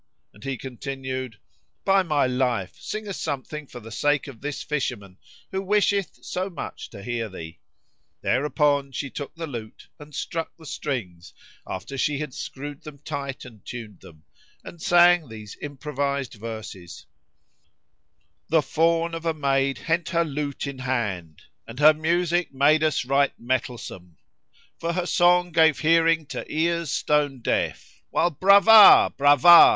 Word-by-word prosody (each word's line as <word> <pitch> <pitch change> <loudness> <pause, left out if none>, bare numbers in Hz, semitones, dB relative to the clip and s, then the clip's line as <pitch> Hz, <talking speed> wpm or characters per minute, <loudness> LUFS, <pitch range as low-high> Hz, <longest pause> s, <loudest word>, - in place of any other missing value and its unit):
and 105 - -17
he 135 -2 -3
continued, 130 -2 -6 0.5
"By 195 0 +4
my 150 -6 +1
life, 125 -6 -1
sing 215 0 -6
us 195 - -5
something 150 0 -5
for 125 - -10
the 115 -1 -12
sake 145 +6 +1
of 135 -6 -11
this 145 0 -4
fisherman 105 -10 -4 0.3
who 190 - -2
wisheth 200 -1 0
so 185 +2 -3
much 170 -6 -7
to 100 - -11
hear 115 -1 -3
thee." 80 -3 -10 0.6
Thereupon 145 0 +1
she 135 0 -4
took 140 - -7
the 165 0 -5
lute 115 -7 -9
and 150 -1 -12
struck 165 +1 -4
the 160 - -15
strings, 95 - -5 0.3
after 110 +9 -6
she 145 +1 +1
had 150 -3 -5
screwed 145 +1 -7
them 150 -2 -11
tight 140 -2 -6
and 115 -5 -14
tuned 110 -6 -8
them, 80 -2 -16 0.4
and 170 - -11
sang 175 -4 +5
these 110 -2 -10
improvised 140 -2 -3
verses, 105 -7 -9 1.4
"The 160 -1 +3
fawn 165 +3 +1
of 165 0 -5
a 165 - 0
maid 135 -2 +1
hent 170 +1 -1
her 170 0 +1
lute 145 -2 -4
in 140 -2 -6
hand 105 - -3
* - - -49
And 115 - -10
her 150 +2 +7
music 170 +2 0
made 145 +3 +3
us 155 -4 +1
right 140 +2 +1
mettlesome: 120 -8 -4 0.6
For 170 +1 -2
her 180 0 -1
song 180 0 +3
gave 160 -2 +4
hearing 165 0 +3
to - - -4
ears 170 0 0
stone 145 -2 0
deaf, - - -1 0.2
* - - -54
While 175 - +1
Brava! 200 +6 +8
Brava! 145 +4 +8
145 Hz, 155 wpm, -24 LUFS, 125-165 Hz, 1.4 s, Brava